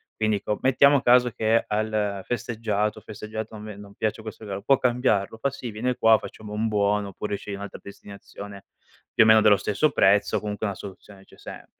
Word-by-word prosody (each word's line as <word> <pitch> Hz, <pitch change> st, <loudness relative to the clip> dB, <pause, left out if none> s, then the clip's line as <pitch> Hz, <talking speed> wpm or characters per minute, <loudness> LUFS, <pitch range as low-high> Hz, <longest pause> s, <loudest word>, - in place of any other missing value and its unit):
quindi 110 Hz, -1 st, +1 dB
dico: 105 Hz, +1 st, -3 dB
"Mettiamo 140 Hz, +1 st, +4 dB
caso 125 Hz, -1 st, +4 dB
che 110 Hz, +1 st, +1 dB
al 105 Hz, -2 st, -1 dB
festeggiato 110 Hz, -3 st, -2 dB
festeggiato, 110 Hz, +1 st, -7 dB
non 105 Hz, -, -9 dB
ve 105 Hz, -, -8 dB
non 100 Hz, -1 st, -13 dB
piace 110 Hz, 0 st, -2 dB
questo 110 Hz, 0 st, -9 dB
regalo, 100 Hz, -1 st, -5 dB
può 135 Hz, +4 st, +4 dB
cambiarlo?" 120 Hz, -4 st, +1 dB
Fa: 140 Hz, -, 0 dB
"Sì, 125 Hz, -4 st, -7 dB
viene 125 Hz, +4 st, -2 dB
qua, 110 Hz, -1 st, +5 dB
facciamo 105 Hz, -1 st, -10 dB
un 110 Hz, +2 st, -1 dB
buono 105 Hz, -1 st, +1 dB
oppure 100 Hz, +1 st, -4 dB
sceglie 100 Hz, 0 st, -7 dB
un'altra 100 Hz, +1 st, -8 dB
destinazione, 100 Hz, 0 st, -11 dB, 0.5 s
più -, -, +6 dB
o -, -, +3 dB
meno 110 Hz, 0 st, +7 dB
dello 105 Hz, -2 st, +5 dB
stesso 105 Hz, +10 st, +1 dB
prezzo, 100 Hz, +1 st, +3 dB
comunque 105 Hz, 0 st, -4 dB
una 100 Hz, -, -4 dB
soluzione 95 Hz, 0 st, -12 dB
c'è -, -, -20 dB
sempre". -, -, -10 dB
105 Hz, 195 wpm, -25 LUFS, 100-115 Hz, 0.5 s, meno